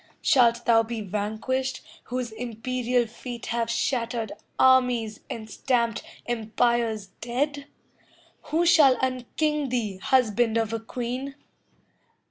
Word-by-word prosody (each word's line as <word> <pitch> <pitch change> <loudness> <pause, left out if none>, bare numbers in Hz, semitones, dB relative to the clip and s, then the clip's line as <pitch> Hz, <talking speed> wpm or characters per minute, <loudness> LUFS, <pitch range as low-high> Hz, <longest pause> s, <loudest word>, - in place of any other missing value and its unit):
Shalt 235 -3 +4
thou 230 -1 +5
be 225 0 -4
vanquished, 215 +6 -2 0.2
whose 250 -2 -3
imperial 245 +2 -1
feet 240 +1 -8
Have 230 -1 0
shattered 230 -2 -1 0.3
armies 250 -4 +3
and 220 -1 -6
stamped 235 0 0 0.2
empires 225 -2 0
dead? 280 +4 -2 0.8
Who 325 +3 +1
shall 295 -6 +6
unking 275 +3 -1
thee, 220 -6 -2
husband 230 +1 +2
of 225 -1 0
a 225 - -1
queen? 250 +4 -5
240 Hz, 105 wpm, -26 LUFS, 225-255 Hz, 0.8 s, shall